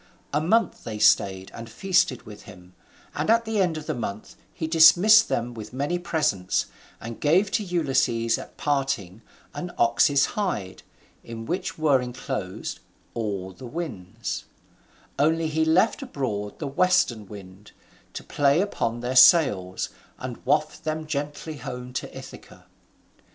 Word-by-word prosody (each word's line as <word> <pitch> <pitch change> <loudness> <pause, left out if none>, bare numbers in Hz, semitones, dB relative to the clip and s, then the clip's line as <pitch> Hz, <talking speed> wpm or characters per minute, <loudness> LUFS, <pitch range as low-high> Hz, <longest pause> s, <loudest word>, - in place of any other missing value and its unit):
A 150 - +2
month 220 +8 +1
they 110 -2 -5
stayed 95 -3 +3
and 115 0 -9
feasted 180 - +1
with 105 -1 -12
him, 90 -2 -15 0.4
and - - -2
at 230 +1 +4
the 220 -2 0
end 175 -4 +1
of 155 - -7
the - - -2
month 110 -3 -6 0.2
he 160 - -5
dismissed 175 +7 +7
them 120 +1 -2
with 110 0 -9
many 145 +7 -1
presents, 150 - 0 0.3
and 115 0 -8
gave 185 +7 +3
to 210 - 0
Ulysses 135 - +1
at - - -11
parting 125 -9 -2 0.3
an 180 0 -5
ox's 135 +4 +4
hide, 180 - -3 0.4
in 115 -1 -8
which 180 +8 -3
were 145 -4 +3
enclosed 125 -6 -5 0.3
all 100 -5 -3
the 125 +7 -10
winds: 125 - -5 0.7
only 160 +3 +2
he 160 +1 0
left 175 - +2
abroad 110 - -4
the 155 - -5
western 140 - +1
wind, 100 0 -12 0.4
to - - -7
play 145 +2 +2
upon 120 - -1
their 125 +1 -3
sails 125 - +5 0.3
and - - -7
waft - - +1
them 155 0 -3
gently 150 +1 -4
home 125 -3 -7
to - - -4
Ithaca. - - -12
135 Hz, 145 wpm, -25 LUFS, 110-165 Hz, 0.7 s, dismissed